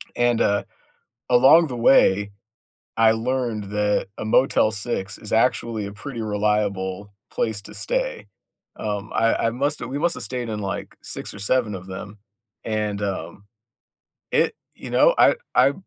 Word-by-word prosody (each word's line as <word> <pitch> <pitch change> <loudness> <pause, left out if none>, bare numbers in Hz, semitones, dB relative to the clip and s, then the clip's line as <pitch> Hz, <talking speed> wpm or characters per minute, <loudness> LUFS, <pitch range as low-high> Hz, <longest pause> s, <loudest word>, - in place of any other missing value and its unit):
And, 120 -1 +2
uh, 100 0 +2 0.7
along 135 +7 +6
the 125 - -5
way, 100 -4 +4 0.7
I 115 -1 +6
learned 115 -2 -1
that 105 0 0
a - - -5
Motel 110 -1 +3
6 100 -2 -3
is 105 - -10
actually 115 -2 +1
a 100 - -7
pretty 115 +3 -7
reliable 105 -2 -1 0.2
place 110 -3 -2
to - - -11
stay. - - -3 0.5
Um, 105 0 -4
I 115 0 +3
I - - +3
must've 140 +1 -2
we 135 - -3
must've 170 -6 0
stayed 120 +1 -3
in 105 -1 -3
like 100 -1 -5
6 - - -6
or - - -10
7 105 0 +1
of 95 0 -9
them, 100 +2 -8 0.4
and, 105 -2 -2
um, 100 0 -4 0.9
it - - +2 0.2
you - - -9
know, - - +5
I - - +6 0.2
I, 140 - +5
110 Hz, 150 wpm, -23 LUFS, 100-125 Hz, 0.9 s, along